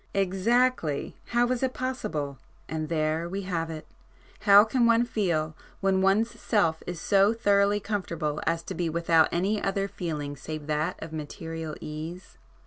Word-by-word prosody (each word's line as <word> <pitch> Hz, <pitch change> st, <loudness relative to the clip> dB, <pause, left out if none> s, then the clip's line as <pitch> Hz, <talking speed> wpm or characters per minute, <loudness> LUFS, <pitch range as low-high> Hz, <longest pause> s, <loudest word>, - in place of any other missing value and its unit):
"Exactly!—How 225 Hz, -, +1 dB
is 250 Hz, -, 0 dB
it 260 Hz, -1 st, -1 dB
possible? 205 Hz, -, -3 dB, 0.3 s
And 155 Hz, -1 st, -3 dB
there 160 Hz, +1 st, 0 dB
we 195 Hz, +2 st, -3 dB
have 165 Hz, -3 st, -2 dB
it—how 200 Hz, +5 st, +2 dB
can 235 Hz, +2 st, +2 dB
one 230 Hz, +1 st, +4 dB
feel, 170 Hz, -9 st, -1 dB, 0.2 s
when 190 Hz, -1 st, +2 dB
one's 205 Hz, +5 st, +3 dB
self 165 Hz, -8 st, +1 dB
is 175 Hz, -2 st, -4 dB
so 200 Hz, +5 st, +3 dB
thoroughly 205 Hz, -2 st, +3 dB
comfortable 170 Hz, -8 st, -3 dB
as 165 Hz, 0 st, +1 dB
to -, -, -6 dB
be 170 Hz, -1 st, -1 dB
without 165 Hz, 0 st, +3 dB
any 200 Hz, +5 st, 0 dB
other 195 Hz, 0 st, 0 dB
feeling 155 Hz, -7 st, -4 dB
save 155 Hz, +2 st, -7 dB
that 150 Hz, +1 st, -1 dB
of 160 Hz, 0 st, -8 dB
material 160 Hz, +1 st, -5 dB
ease? 160 Hz, +4 st, -7 dB
180 Hz, 145 wpm, -27 LUFS, 155-205 Hz, 0.3 s, one